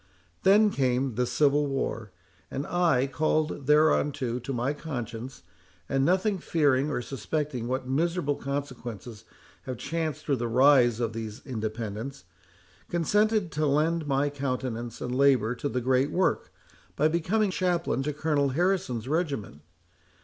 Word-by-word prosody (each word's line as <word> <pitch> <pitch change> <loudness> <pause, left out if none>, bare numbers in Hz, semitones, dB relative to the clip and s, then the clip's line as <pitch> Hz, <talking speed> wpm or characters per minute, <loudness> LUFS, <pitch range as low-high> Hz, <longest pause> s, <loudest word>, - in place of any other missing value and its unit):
Then 205 +2 +5
came 130 -3 0
the 125 +2 0
Civil 145 +1 +2
War, 115 -6 -3 0.4
and 135 +2 -4
I—called 155 -2 +1
thereunto 145 -4 +2
by 125 +3 -6
my 125 +3 -1
conscience, 125 - -6 0.4
and 135 0 +1
nothing 190 +5 +2
fearing 145 -4 +2
or 125 -4 -2
suspecting 135 0 -3
what 130 +1 -2
miserable 155 +2 0
consequences 125 -6 -6 0.4
have 130 -2 -4
chanced 155 +2 -3
through 140 -3 +1
the 120 0 -2
rise 125 -1 +5
of 115 -2 -1
these 110 -1 -6
Independents—consented 115 - -3
to 150 +1 0
lend 155 +2 +1
my 140 +1 +1
countenance 125 -4 -4
and 125 - -3
labour 130 -4 +3
to 135 +4 -3
the 125 - -2
great 130 +3 +2
work, 185 +1 0 0.4
by 150 - +3
becoming 185 +6 +1
chaplain 175 -6 0
to 150 +2 -1
Colonel 145 -1 0
Harrison's 140 - 0
regiment. 140 - -2
140 Hz, 130 wpm, -27 LUFS, 120-155 Hz, 0.4 s, Then